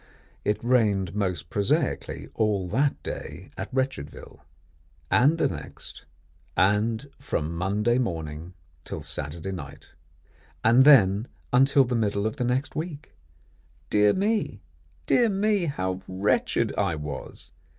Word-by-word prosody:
It 105 +2 -1
rained 105 -7 +2
most 90 -6 -2
prosaically 135 +8 -1
all 105 -4 0
that 135 +8 0
day - - -7
at 95 - -6
Wretchedville, 130 - -4 0.7
and 145 +6 +4
the - - +2
next, 75 -4 -9 0.5
and 105 +7 +2
from 85 - -2
Monday 105 +7 +1
morning 80 -5 -4 0.3
till 80 - -6
Saturday 80 +4 -5
night, 70 -7 -8 0.7
and 120 +4 +6
then 110 -6 +6 0.3
until 135 +2 +5
the 125 - -3
middle 105 -3 0
of 110 - -2
the - - -1
next 125 +4 -1
week! 155 -2 -5 0.8
Dear 105 0 +5
me! 200 - -1 0.4
dear 235 - +4
me! 205 -1 +1
how 95 - -2
wretched 95 +3 0
I 85 - +1
was! 75 -1 -7
105 Hz, 120 wpm, -26 LUFS, 90-130 Hz, 0.8 s, and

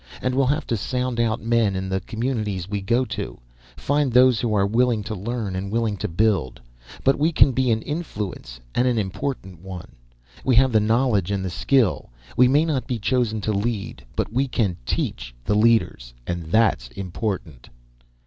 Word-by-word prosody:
And 130 - -1
we'll 135 0 +2
have 145 +3 0
to 115 - -1
sound 125 +3 -2
out 115 0 +1
men 115 -4 +2
in 95 0 -3
the 95 0 -1
communities 110 -5 -3
we 100 0 -3
go 120 +6 +1
to, - - -5 0.4
find 145 -1 +1
those 125 -1 +5
who 120 - 0
are 100 -1 +3
willing 115 +1 +2
to 110 +2 -5
learn 105 -1 -3
and 95 +1 -4
willing 115 -2 0
to - - -2
build. 95 - 0 0.4
But 135 +1 +3
we 155 +3 +3
can 150 - +5
be 130 0 +1
an 110 -1 +1
influence, 105 - -5
and 125 - +2
an 120 -2 +1
important 95 - -4
one. 95 -2 -8 0.5
We 130 - +3
have 130 +2 +5
the 110 - +4
knowledge 110 -3 +2
and 100 -2 -1
the 90 - -3
skill. 95 - +1 0.3
We 125 - +6
may 145 +5 +4
not 135 -7 -1
be 125 - -1
chosen 110 -1 0
to 110 - -1
lead, 100 - -3
but - - -2
we 135 +3 +1
can 105 -8 0
teach - - -3
the 105 - +1
leaders. 105 - +2
And 85 +2 -3
that's 95 - +2
important." 90 - -5
110 Hz, 185 wpm, -23 LUFS, 95-125 Hz, 0.5 s, We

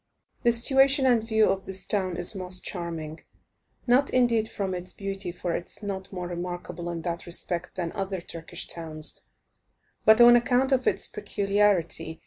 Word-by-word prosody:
The 235 - +3
situation 270 +3 +4
and 240 -4 +3
view 220 -1 +2
of 195 0 -5
this 190 0 -4
town 185 -4 -1
is 175 +3 +6
most 185 -2 0
charming; 165 -3 -5 0.7
not 260 +3 +3
indeed 235 -3 +1
from 195 -2 -4
its 180 0 -7
beauty, 195 -2 -5
for 175 -1 -4
it 175 - -5
is - - -6
not 190 -2 -6
more 180 -2 -5
remarkable 175 0 -6
in 170 -1 -6
that 170 0 -5
respect 175 0 -2
than 175 -3 -4
other 195 -1 -4
Turkish 165 -1 -4
towns, 160 -2 +2 0.8
but 220 +1 +5
on 240 0 +8
account 250 +3 +1
of 255 -1 +1
its - - 0
peculiarity. 200 -6 -1
190 Hz, 165 wpm, -26 LUFS, 175-220 Hz, 0.8 s, on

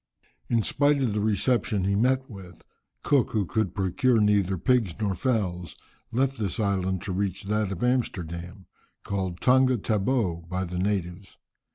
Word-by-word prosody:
In 115 -2 +2
spite 145 +4 +2
of 125 -6 0
the 105 - -1
reception 110 0 +1
he 100 +1 +1
met 130 +5 +1
with, 95 -5 -12 0.4
Cook, 140 -5 +2
who 105 -3 +1
could 110 -2 -1
procure 110 +6 +2
neither 100 -3 +2
pigs 110 -3 +1
nor 105 -3 0
fowls, 90 - -2 0.4
left 135 +2 0
this 105 +1 -2
island 95 -3 0
to 95 - -4
reach 95 0 -2
that 105 0 -1
of 95 +2 -4
Amsterdam, 95 -7 -2 0.4
called 95 -3 -3
Tonga 130 0 +4
Tabou 100 -6 -1
by 95 0 -2
the 90 0 -4
natives. 95 -1 -3
100 Hz, 155 wpm, -26 LUFS, 95-120 Hz, 0.4 s, Tonga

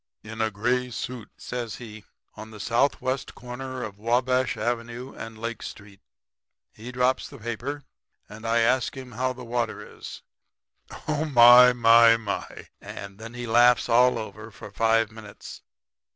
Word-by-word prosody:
"'In 110 +1 -6
a 110 - +1
gray 125 +4 -1
suit,' 120 -2 -6
says 120 -4 -5
he, 110 -3 -11 0.3
'on 110 +1 -10
the 110 -1 -12
southwest 130 +3 -1
corner 130 +1 -7
of 100 -1 -8
Wabash 125 +3 +1
avenue 120 +2 -4
and 115 -1 -9
Lake 115 +1 -5
street. 100 -1 -10 0.7
He 115 +3 -9
drops 125 +1 0
the 140 - -12
paper, 120 +5 -5 0.4
and 105 +2 -12
I 115 +1 +2
ask 125 +4 +1
how 130 0 -3
the 125 0 -10
water 115 -2 -4
is. - - -9 0.8
Oh, 155 0 0
my, 125 -3 +8
my, 115 -1 +6
my!' 105 -3 -6
And 100 0 -9
then 115 +2 -9
he 120 0 -5
laughs 120 +1 +4
all 125 +2 +4
over 110 0 -8
for 105 -1 -12
five 115 +1 +2
minutes. 110 -2 -11
120 Hz, 150 wpm, -25 LUFS, 110-125 Hz, 0.8 s, my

